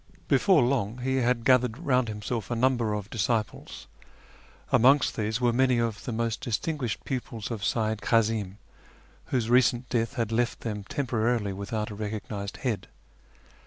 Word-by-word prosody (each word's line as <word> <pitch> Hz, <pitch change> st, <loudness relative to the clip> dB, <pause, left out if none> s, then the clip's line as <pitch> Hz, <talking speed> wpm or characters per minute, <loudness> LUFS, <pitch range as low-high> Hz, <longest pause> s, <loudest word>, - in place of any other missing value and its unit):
Before 185 Hz, -, +4 dB
long 120 Hz, -3 st, 0 dB
he 130 Hz, +1 st, 0 dB
had 125 Hz, -2 st, +1 dB
gathered 125 Hz, -3 st, +4 dB
round 130 Hz, -6 st, +1 dB
himself 105 Hz, 0 st, -4 dB
a 120 Hz, -, -1 dB
number 120 Hz, -3 st, +1 dB
of 105 Hz, 0 st, -6 dB
disciples. 110 Hz, -1 st, -2 dB, 0.9 s
Amongst 135 Hz, +4 st, +5 dB
these 110 Hz, +1 st, -1 dB
were 120 Hz, -1 st, +2 dB
many 130 Hz, 0 st, +3 dB
of 115 Hz, -2 st, -2 dB
the 125 Hz, -, -3 dB
most 115 Hz, -1 st, -2 dB
distinguished 125 Hz, 0 st, -2 dB
pupils 120 Hz, -4 st, -4 dB
of 110 Hz, -3 st, -4 dB
Seyyid 110 Hz, -2 st, 0 dB
Kazim, 110 Hz, -3 st, +1 dB, 0.7 s
whose 120 Hz, -4 st, -1 dB
recent 125 Hz, 0 st, +3 dB
death 115 Hz, -2 st, -1 dB
had 115 Hz, -2 st, -1 dB
left 120 Hz, +1 st, 0 dB
them 105 Hz, -3 st, -4 dB
temporarily 115 Hz, -5 st, 0 dB
without 105 Hz, +2 st, -4 dB
a -, -, -6 dB
recognised 105 Hz, -1 st, -5 dB
head. 110 Hz, -6 st, -1 dB
115 Hz, 150 wpm, -27 LUFS, 110-125 Hz, 0.9 s, Amongst